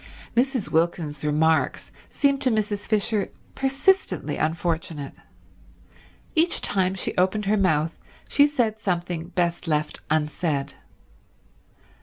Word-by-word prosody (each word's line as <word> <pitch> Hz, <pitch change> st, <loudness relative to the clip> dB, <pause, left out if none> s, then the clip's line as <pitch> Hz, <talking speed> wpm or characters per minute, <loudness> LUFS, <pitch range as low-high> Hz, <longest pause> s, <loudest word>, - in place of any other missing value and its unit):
Mrs. 250 Hz, -2 st, +1 dB
Wilkins's 160 Hz, -3 st, 0 dB
remarks 155 Hz, +2 st, +1 dB, 0.2 s
seemed 280 Hz, -1 st, +1 dB
to 260 Hz, -, +3 dB
Mrs. 210 Hz, -2 st, -1 dB
Fisher 215 Hz, -1 st, +1 dB, 0.2 s
persistently 275 Hz, +9 st, +1 dB
unfortunate. 160 Hz, -2 st, -2 dB, 1.2 s
Each 330 Hz, +2 st, +2 dB
time 190 Hz, -1 st, +1 dB
she 190 Hz, -, -3 dB
opened 190 Hz, +3 st, +2 dB
her 205 Hz, +2 st, +3 dB
mouth 165 Hz, -5 st, +1 dB, 0.3 s
she 285 Hz, 0 st, +5 dB
said 235 Hz, -7 st, 0 dB
something 175 Hz, -4 st, -2 dB
best 175 Hz, -1 st, -1 dB
left 150 Hz, -1 st, -1 dB
unsaid. 150 Hz, -1 st, 0 dB
180 Hz, 105 wpm, -24 LUFS, 160-220 Hz, 1.2 s, she